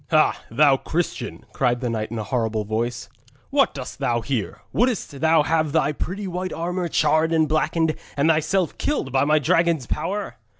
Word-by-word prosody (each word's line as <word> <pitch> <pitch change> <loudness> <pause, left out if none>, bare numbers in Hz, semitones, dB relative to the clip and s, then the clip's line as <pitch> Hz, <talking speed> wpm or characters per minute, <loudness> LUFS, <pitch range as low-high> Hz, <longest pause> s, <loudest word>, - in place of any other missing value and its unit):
'Ha! - - +3
thou 140 +3 +4
Christian!' 170 +5 -3
cried 125 -2 +1
the 125 - -2
knight 110 -2 -2
in 115 - -5
a 110 - -2
horrible 110 -2 -1
voice, 115 +2 -2 0.4
'what - - +3
dost - - -7
thou 120 -1 0
here? 120 -5 -3
Wouldst 220 - 0
thou 160 -1 +4
have 155 -1 0
thy 160 -2 +2
pretty 190 +7 -4
white 185 0 -3
armour 175 +2 -2
charred 155 0 +2
and 160 -1 +3
blackened 155 +1 +1 0.2
and 140 +2 +3
thyself 165 +3 +1
killed 285 - -1
by 135 +2 +2
my 155 +1 +4
dragon's 160 0 +2
power?' 200 +9 -3
155 Hz, 175 wpm, -23 LUFS, 125-165 Hz, 0.4 s, thou